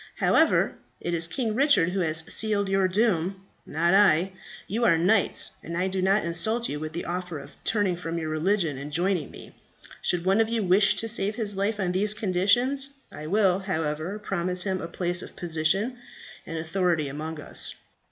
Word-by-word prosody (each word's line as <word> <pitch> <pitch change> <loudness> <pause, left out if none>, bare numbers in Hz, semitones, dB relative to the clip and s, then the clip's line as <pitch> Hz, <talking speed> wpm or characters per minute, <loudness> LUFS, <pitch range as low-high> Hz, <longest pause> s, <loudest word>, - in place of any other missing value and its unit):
However, - - +3 0.2
it 175 - -3
is 165 -1 +1
King 220 +5 -2
Richard 275 - +4
who 190 +2 -2
has 160 -2 0
sealed 210 -2 +1
your 195 -1 +3
doom, 190 -2 0 0.2
not 170 +4 +1
I. 190 -2 +5 0.4
You 225 +4 -1
are 170 -8 +5
knights, 190 +5 +2
and 170 0 -5
I 185 +2 +1
do 190 0 -2
not 195 +2 +2
insult 220 +8 +1
you 145 - -4
with 155 +1 -5
the 170 - -4
offer 180 -1 -4
of 140 0 -10
turning 205 -5 +1
from 170 -1 -4
your 160 -1 -3
religion 160 -2 0
and 145 +2 -7
joining 175 -1 0
me. - - -12 0.5
Should 175 -1 +1
one 195 +4 +4
of 220 - +1
you 230 -2 0
wish 195 +2 +4
to 225 - -3
save 215 -2 -2
his 215 -3 -3
life 205 +2 -1
on 185 -3 0
these 205 +3 0
conditions, 220 +8 +1 0.2
I 155 - -8
will, 190 0 +3
however, 160 0 -2
promise 180 -3 -2
him 190 -2 -2
a 165 - -4
place 175 0 -3
of - - -11
position 175 +9 0 0.5
and 165 - -4
authority 165 -1 0
among 155 +3 -5
us." - - -5
185 Hz, 190 wpm, -26 LUFS, 165-205 Hz, 0.5 s, I